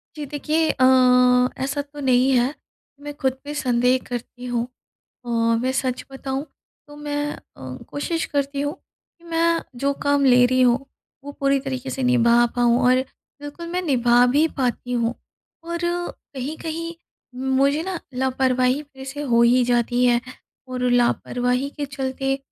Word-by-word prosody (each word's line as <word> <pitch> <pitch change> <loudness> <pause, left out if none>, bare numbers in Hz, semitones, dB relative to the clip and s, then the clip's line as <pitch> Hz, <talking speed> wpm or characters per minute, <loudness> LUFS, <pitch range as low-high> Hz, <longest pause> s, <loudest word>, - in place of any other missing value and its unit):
जी, 300 -1 -5
देखिए 305 +3 0
अ, 260 - -1 0.8
ऐसा 280 +2 -1
तो 290 +1 -12
नहीं 260 0 +3
है। 250 +4 +1 0.5
मैं 290 0 -6
ख़ुद 265 -1 +1
पे 290 - -6
संदेह 250 -2 +2
करती 245 0 -6
हूँ। 240 -1 -1 0.6
अ, - - -10 0.3
मैं 260 - 0
सच 255 -1 -3
बताऊँ, 270 +1 -4 0.4
तो 290 - -13
मैं 290 0 -3 0.3
अ, 130 -1 -8
कोशिश 325 +3 -2
करती 280 0 0
हूँ 290 +3 -2
कि 340 -2 -31
मैं 335 0 +1 0.2
जो 280 - +3
काम 285 -1 +3
ले 250 -1 +6
रही 255 +1 +1
हूँ, 250 +2 +2 0.4
वो 285 - -7
पूरी 275 -1 +2
तरीके 265 -1 -5
से 265 - -4
निभा 240 -1 +4
पाऊँ 240 0 +3
और 255 0 +4 0.4
बिल्कुल, 290 +4 -8
मैं 355 +2 -2
निभा 245 -5 +4
भी 290 +6 +3
पाती 250 -1 -1
हूँ 235 0 0 0.5
और 340 0 -3 0.6
कहीं-कहीं 320 +5 -5 0.4
मुझे 265 +3 +1
ना 365 -1 -4 0.2
लापरवाही 260 +1 +1
फ़िर 270 -2 -13
से 290 +2 -5
हो 235 -4 +3
ही 245 +1 +4
जाती 245 0 +1
है 240 -1 +4 0.5
और 255 -1 -4
लापरवाही 245 +2 +1
के 290 -1 -3
चलते, 270 0 -2
265 Hz, 155 wpm, -22 LUFS, 250-290 Hz, 0.8 s, ले